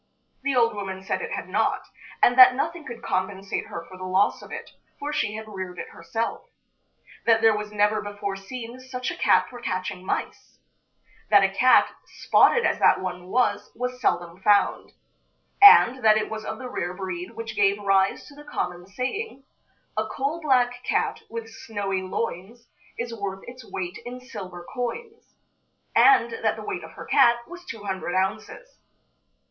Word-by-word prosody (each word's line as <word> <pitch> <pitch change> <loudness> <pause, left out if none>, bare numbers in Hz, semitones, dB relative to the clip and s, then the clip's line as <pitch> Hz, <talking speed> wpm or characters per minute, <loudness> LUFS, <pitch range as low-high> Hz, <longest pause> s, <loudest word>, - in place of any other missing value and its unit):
The 275 0 0
old 230 -2 +3
woman 190 -2 -6
said - - -2
it 470 0 -5
had - - -4
not, - - 0 0.4
and 245 - +6
that 255 0 +9
nothing 325 +4 -3
could 235 -2 -8
compensate 190 +1 -2
her 170 - -7
for 185 - -12
the - - -7
loss 185 +2 +1
of - - -13
it, - - -7 0.3
for 295 +1 -4
she 215 -7 -1
had 220 0 -7
reared 185 -3 -7
it - - -6
herself; 225 0 -4 0.8
that 225 -1 +5
there 225 -1 +6
was 210 0 -5
never 210 +1 +2
before 205 -1 -5
seen 235 +5 -8
such 255 0 -5
a - - -6
cat - - +3
for 245 -1 -11
catching 185 -3 -3
mice; - - -4 0.7
that 205 -2 +6
a 195 - +3
cat, 255 +6 +5
spotted 475 0 +3
as - - +1
that - - +5
one 180 -1 -5
was, 250 +6 0
was 250 +1 -4
seldom 175 -4 -1
found; 205 0 +2 0.7
and 260 - +8
that 215 -1 +6
it 215 - -2
was 220 0 -5
of - - -4
the 255 - -7
rare 180 -8 -4
breed 185 -1 -6
which 230 0 -6
gave 200 0 +3
rise 195 -1 +2
to 290 - -14
the 295 +1 -13
common 180 -11 -4
saying: 270 - -4 0.5
"A 215 0 -1
coal 280 +8 -3
black 245 -4 +2
cat, - - -1
with 230 0 -6
snowy 205 -4 -4
loins, 205 +4 -5 0.3
Is 235 0 -4
worth 200 -3 -5
its 250 +1 -10
weight 180 -1 -5
in 250 +1 -7
silver 190 -8 -9
coins." 435 - -6 0.6
and - - +6
that - - +2
the - - -8
weight - - -4
of - - -11
her - - -9
cat 235 0 +4
was 355 +1 -10
two 225 -8 -8
hundred 190 -2 -3
ounces. 215 - -3
220 Hz, 175 wpm, -25 LUFS, 190-250 Hz, 0.8 s, that